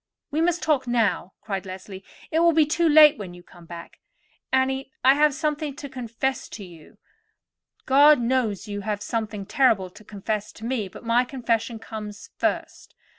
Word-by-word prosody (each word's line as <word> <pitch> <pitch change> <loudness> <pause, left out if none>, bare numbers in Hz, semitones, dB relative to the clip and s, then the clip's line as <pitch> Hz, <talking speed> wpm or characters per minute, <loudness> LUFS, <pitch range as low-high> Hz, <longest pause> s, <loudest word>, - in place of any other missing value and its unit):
"We 305 +2 0
must 345 +1 +1
talk 285 -5 +1
now," 225 -6 0
cried 195 -2 -4
Leslie; 190 +1 -9 0.3
"it 320 - +2
will 335 0 +5
be 315 -1 +4
too 330 +2 +1
late 300 -2 +7
when 185 -4 -7
you 175 - -14
come 175 -1 -17
back. 170 0 -10 0.5
Annie, 265 0 0
I 265 - +8
have 300 +1 +4
something 300 -1 -2
to 285 - -7
confess 255 0 -3
to 205 - -8
you; 170 -4 -14
and - - -22 0.9
you—God 290 +2 +6
knows 235 -4 0
you 205 -1 -4
have 205 0 -3
something 215 -3 -3
terrible 215 -7 +2
to 210 - -15
confess 210 +1 -4
to 225 - -10
me; 235 -5 -2
but 190 - -13
my 235 +2 +3
confession 235 -3 -2
comes 215 -2 -9
first. - - -3
235 Hz, 175 wpm, -24 LUFS, 205-280 Hz, 0.9 s, I